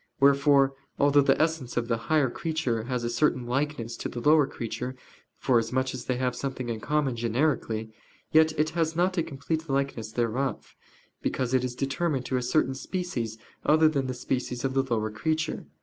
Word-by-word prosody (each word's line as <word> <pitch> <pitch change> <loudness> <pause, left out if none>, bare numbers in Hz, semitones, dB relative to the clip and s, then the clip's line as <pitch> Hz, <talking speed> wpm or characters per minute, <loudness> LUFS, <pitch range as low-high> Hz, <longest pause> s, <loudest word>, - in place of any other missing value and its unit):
Wherefore 140 0 +5 0.2
although 145 0 +5
the 140 - +3
essence 155 -7 0
of 120 -1 0
the 115 - +1
higher 150 -5 +3
creature 145 -10 -2
has 125 -1 -2
a - - 0
certain 125 -1 +1
likeness 125 -2 -2
to - - -4
the 120 - -5
lower 150 +2 +5
creature, 125 +2 -5 0.4
forasmuch 130 +1 +1
as 125 -1 -6
they 125 - 0
have 125 -1 0
something 130 -1 -4
in 115 -2 -2
common 145 +1 0
generically, 115 -2 0 0.4
yet 160 0 +5
it 155 +1 +2
has 160 -1 0
not 180 +2 +2
a - - +4
complete 160 +2 -3
likeness 135 -5 -1
thereof, 120 +4 -2 0.5
because 130 -1 -1
it 130 -1 +3
is 125 -1 -3
determined 135 0 -1
to 130 - 0
a - - 0
certain 130 +2 +1
species 130 - -3 0.3
other 155 +1 +5
than 140 -4 0
the 130 - -3
species 125 0 -2
of 130 - 0
the 135 - +3
lower 115 -5 -1
creature. 160 +8 -2
135 Hz, 180 wpm, -27 LUFS, 120-150 Hz, 0.5 s, Wherefore